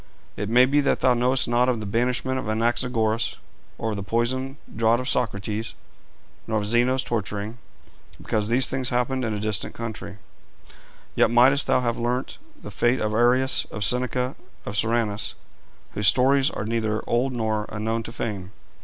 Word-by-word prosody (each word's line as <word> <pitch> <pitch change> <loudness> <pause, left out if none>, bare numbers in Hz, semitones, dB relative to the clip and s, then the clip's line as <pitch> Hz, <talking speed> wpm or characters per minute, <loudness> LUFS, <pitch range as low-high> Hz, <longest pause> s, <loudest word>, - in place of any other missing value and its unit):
It 105 +1 -4
may 125 +3 +6
be 145 +3 +2
thou 130 -2 +2
knowest 125 +2 +2
not 120 +1 +2
of 120 -3 0
the 105 - -5
banishment 125 +4 0
of 120 - -5
Anaxagoras, 115 0 0 0.4
of 110 -1 -2
the 100 - -4
poison 125 +7 -1 0.2
draught 115 +1 +3
of 125 - -5
Socrates, 110 -1 -2 0.7
nor 110 -1 0
of 105 - -1
Zeno's 120 +4 +2
torturing, 105 0 -4 0.6
because 105 -1 -1
these 125 +2 +3
things 130 -1 -1
happened 125 +1 0
in 115 - -1
a - - -3
distant 105 -2 -3
country; 110 -3 -6 1.0
yet - - +3
mightest 130 +4 +4
thou - - +3
have 120 -2 -1
learnt 125 +2 -2 0.2
the - - -9
fate 120 +2 +1
of 110 0 -1
Arrius, 125 +3 +3
of 105 - -5
Seneca, 125 +4 +1 0.3
of 100 - -5
Soranus, 110 -1 0 0.6
whose 105 -1 0
stories 135 - +4
are 100 - -5
neither 110 -1 -1
old 125 +3 +1
nor 110 -3 -1
unknown 110 +2 -2
to 115 - -8
fame. 100 -6 -4
120 Hz, 160 wpm, -24 LUFS, 110-125 Hz, 1.0 s, may